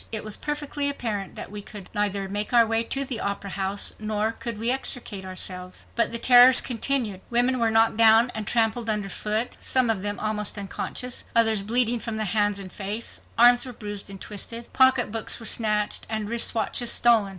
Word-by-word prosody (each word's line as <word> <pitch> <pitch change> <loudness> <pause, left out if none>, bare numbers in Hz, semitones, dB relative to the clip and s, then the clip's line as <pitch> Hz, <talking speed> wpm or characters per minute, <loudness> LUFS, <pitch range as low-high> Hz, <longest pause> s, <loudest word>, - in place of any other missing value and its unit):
It 220 -2 -1
was 215 -1 -4
perfectly 290 -1 -3
apparent 220 -8 -5
that - - -7
we 210 0 -6
could 200 -2 -10
neither 200 -1 -1
make 205 +4 -3
our 235 -1 +6
way 225 +1 0
to 275 +3 -1
the 255 -4 -3
Opera 200 -1 -4
House 195 +1 0
nor 215 0 -2
could 230 -1 -5
we 230 +3 +1
extricate 245 -6 -4
ourselves. 185 -1 -5
But 235 - +1
the 235 - 0
terrors 250 +2 +7
continued. 235 -5 0
Women 245 +2 +1
were 230 -1 +2
knocked 225 0 +2
down 225 +2 +6
and 215 -2 -5
trampled 230 0 0
under 210 -2 -1
foot, 215 +5 -2
some 255 -3 +2
of 205 -4 -3
them 205 +1 -2
almost 210 -1 -1
unconscious, 220 +5 -4
others 225 -3 +4
bleeding 235 +3 +1
from 225 -1 -5
the 215 - -1
hands 205 +1 0
and 190 -2 -7
face; 210 +3 -3 0.2
arms 245 +1 +6
were 250 - -8
bruised 205 -3 -8
and 195 -1 -10
twisted; 230 +4 -4
pocketbooks 250 -4 +2
were 225 - -10
snatched 210 -2 0
and 215 -2 -2
wrist 235 0 +1
watches 235 +1 +1
stolen. 230 -4 +3
220 Hz, 195 wpm, -24 LUFS, 205-240 Hz, 0.2 s, terrors